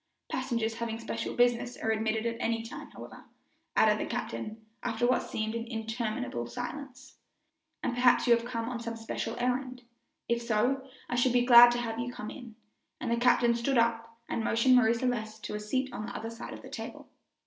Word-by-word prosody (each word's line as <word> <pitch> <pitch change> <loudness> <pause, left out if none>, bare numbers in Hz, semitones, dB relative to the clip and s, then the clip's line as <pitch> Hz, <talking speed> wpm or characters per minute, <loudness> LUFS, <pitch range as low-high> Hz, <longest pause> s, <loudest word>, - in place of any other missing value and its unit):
"Passengers 235 -4 -1
having 230 -1 -3
special 230 0 -4
business 245 0 +2
are 220 - 0
admitted 220 0 0
at 230 0 -1
any 230 -1 0
time, 230 - -8
however," - - -11 0.5
added - - +4
the - - -3
captain, 220 +1 -5 0.2
after 240 0 0
what 250 0 +3
seemed 220 0 -2
an 230 0 -4
interminable 225 - -3
silence, 265 - -7 0.7
"and - - 0
perhaps 245 0 +4
you 240 - +6
have 230 - -3
come 230 -1 -3
on 245 -1 -3
some 230 0 -5
special 225 0 -4
errand. 250 +1 -1 0.4
If 235 0 +1
so, 245 +4 0 0.2
I - - -4
should 245 0 +3
be 245 0 +3
glad 240 -1 +10
to - - -1
have 225 -1 -3
you 240 +1 -2
come 215 -3 -6
in," 240 -5 -10 0.4
and 240 - -3
the 235 - +2
captain 240 0 +4
stood 235 +3 0
up 230 0 +1
and 225 - -2
motioned 230 +3 +4
Marie 230 -2 +5
Celeste 220 -3 -2
to - - -5
a 210 - -2
seat 255 +5 -2
on 215 -2 -5
the - - -7
other 225 +1 -4
side 230 +1 -7
of - - -12
the - - -10
table. - - -7
235 Hz, 200 wpm, -30 LUFS, 225-245 Hz, 0.7 s, glad